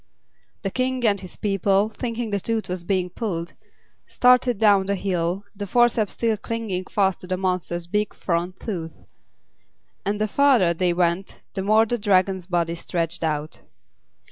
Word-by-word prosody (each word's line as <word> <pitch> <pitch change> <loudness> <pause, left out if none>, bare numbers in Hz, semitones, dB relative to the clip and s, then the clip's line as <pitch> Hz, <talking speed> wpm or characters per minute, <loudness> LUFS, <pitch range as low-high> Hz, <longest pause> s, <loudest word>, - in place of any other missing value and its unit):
The 195 - -2
King 255 +1 -1
and 200 -2 +3
his 185 - -8
people, 200 0 +1
thinking 230 0 -4
the 200 - 0
tooth 225 +2 -2
was 180 -1 -3
being 180 -1 -1
pulled, 175 -6 -4 0.5
started 250 -2 +4
down 200 -3 +4
the 200 - +1
hill, 180 0 -1
the 205 0 -5
forceps 235 -1 +2
still 225 -2 0
clinging 210 -4 -3
fast 195 -2 +1
to 180 - -10
the 185 0 -1
monster's 180 -2 -1
big 210 +4 -1
front 175 +1 -2
tooth. 170 -7 -5 1.1
And 205 +1 -1
the 215 - +1
farther 240 -8 +4
they 180 +1 +1
went 175 +2 -1
the 190 - -2
more 215 +3 +4
Dragon's 195 -5 +1
body 170 -2 0
stretched 170 0 -2
out. 155 -1 -2
195 Hz, 155 wpm, -23 LUFS, 180-215 Hz, 1.1 s, started